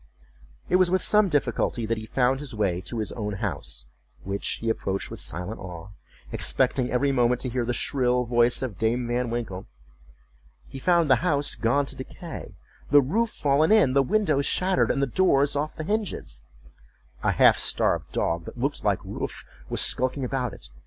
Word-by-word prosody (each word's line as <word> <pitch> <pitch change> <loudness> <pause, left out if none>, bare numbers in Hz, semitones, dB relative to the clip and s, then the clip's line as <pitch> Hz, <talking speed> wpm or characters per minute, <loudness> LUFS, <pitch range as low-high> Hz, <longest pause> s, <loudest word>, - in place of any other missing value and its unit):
It 180 - +3
was 185 -1 +3
with 185 0 +1
some 210 -2 +4
difficulty 125 -5 0
that 115 0 -1
he 110 - -9
found 130 +2 +1
the 135 -6 -7
way 95 -4 0
to 120 - -4
his 110 -2 -2
own 105 -3 -4
house, 95 - -4 0.4
which 100 +1 -2
he 115 - -5
approached 100 -3 -2
with - - -7
silent 90 +7 -4
awe, 90 -1 -8 0.4
expecting 125 -1 +1
every 140 +3 +1
moment 125 -1 +2
to 130 - -2
hear 120 0 -1
the 120 - -1
shrill 125 -2 0
voice 120 +1 +2
of 110 -9 -5
Dame 120 +2 0
Van 120 0 -1
Winkle. 115 -6 -4 1.0
He 135 - -9
found 170 +2 +3
the 130 -2 +5
house 145 -2 +2
gone 130 +5 +1
to - - -4
decay—the 140 - -2
roof 210 - +1
fallen 150 -2 +2
in, 210 -12 +5
the 140 - +5
windows 140 -2 +1
shattered, 185 0 +1
and 140 - +1
the - - +4
doors 140 -2 +2
off 150 +2 -2
the 155 - -5
hinges. 205 - -3 0.8
A - - +1
half - - +5
starved - - 0
dog 85 0 -1
that - - -9
looked - - -2
like - - 0
Wolf - - -6 0.2
was - - -1
skulking 130 +1 0
about 125 -1 -2
it. - - -11
125 Hz, 180 wpm, -25 LUFS, 110-145 Hz, 1.0 s, the